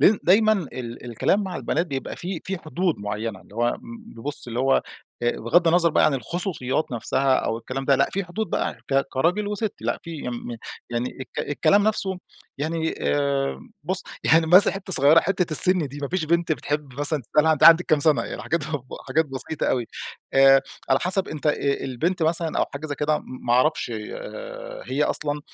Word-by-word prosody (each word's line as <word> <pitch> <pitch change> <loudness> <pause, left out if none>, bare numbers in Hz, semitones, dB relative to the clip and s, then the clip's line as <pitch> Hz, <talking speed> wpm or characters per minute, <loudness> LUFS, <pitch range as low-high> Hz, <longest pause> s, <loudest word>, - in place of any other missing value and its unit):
لإن 205 0 +5
دايمًا 215 +4 +4
ال 130 - -5
الكلام 125 - 0
مع 185 -3 -5
البنات 165 +3 -2
بيبقى 135 -3 -5
في 180 -1 -6
في 190 0 -4
حدود 170 +2 -2
معينة، 105 0 -5
اللي 100 - -19
هو 120 +1 +1
امم 235 - -8
ب - - -11
بص 145 +3 0
اللي 120 0 -5
هو 135 +1 +2 0.4
آآ، 120 - +2
بِغضّ 165 +9 +2
النظر 170 0 +3
بقى - - +3
عن 145 - +1
الخصوصيات 150 - -3
نفْسها 130 +3 0
أو 115 - -1
الكلام 130 +3 -6
ده 135 0 +3
لأ، 140 - +2
في 195 -1 -3
حدود 210 +5 -4
بقى - - -2
ك 135 0 +3
كراجل 175 +10 0
وست 210 0 -3
لأ، 115 +1 -2
في 170 - -9
يم 120 -1 -6 0.3
يعني 120 +1 -2
الك 130 - -6
الكلام 200 +7 +3
نفْسه، 195 -3 -1 0.4
يعني 160 +2 -2
آمم 140 - -2
بُص، 185 +4 0 0.2
يعني 160 0 +4
مثلًا 180 +5 +6
حتة 195 -1 -5
صغيرة، 150 +2 +5
حتة 180 -4 -1
السّن 175 0 +10
دي، 140 +2 -10
ما 140 -1 -4
فيش 180 -3 -2
بنْت 170 0 0
بتحب 145 0 -4
مثلًا 145 -1 +2
تسألها 160 +1 +4
أنتِ 155 - -3
عندِك 165 +2 +8
كم 155 -3 +2
سنة؟ 155 0 +3
يعني - - -6
الحاجات 170 - -2
بتبقى 145 -3 -7
حاجات 160 +5 +1
بسيطة 135 +3 -5
أوي. 120 -3 -1 0.5
آآ، 135 0 +6 0.3
على 135 - +4
حَسب 190 +1 +1
أنت 155 0 -6
آآ 150 - +3 0.3
البنت 160 +8 -2
مثلًا 165 0 0
أو - - +2
حاجة 150 +3 -6
زَي 145 - -4
كده، 150 +1 0
م - - -13 0.2
ما 120 - +1
أعرفْش 130 0 +1
آآ، - - -8
هي 140 +3 -1
أصلًا 150 0 -1
155 Hz, 200 wpm, -23 LUFS, 135-180 Hz, 0.5 s, السّن